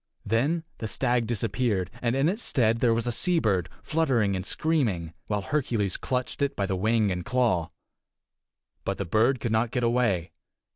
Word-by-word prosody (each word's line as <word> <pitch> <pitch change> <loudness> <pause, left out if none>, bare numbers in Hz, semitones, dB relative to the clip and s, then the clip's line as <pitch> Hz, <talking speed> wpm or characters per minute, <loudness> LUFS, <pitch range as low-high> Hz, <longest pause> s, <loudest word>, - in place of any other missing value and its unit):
Then 140 +10 +1 0.2
the 110 - -3
stag 120 0 0
disappeared, 105 -4 -1
and 120 0 +1
in 135 +3 +2
its 205 +7 -1
stead 115 - +2
there 120 -1 +3
was 115 +1 +1
a 120 - 0
seabird, 115 - +2
fluttering 125 -11 +1
and 95 - -3
screaming, 105 - 0
while 105 -2 -1
Hercules 115 -7 0
clutched 125 0 -3
it 140 -1 0
by 100 - 0
the 95 -1 -1
wing 110 +1 +2
and 90 -1 -3
claw. 110 -8 +1 1.1
But 100 - -2
the 100 - -3
bird 115 +8 +2
could 115 0 -2
not 110 +1 +2
get 125 +1 -2
away. 115 -8 +1
115 Hz, 175 wpm, -27 LUFS, 100-125 Hz, 1.1 s, there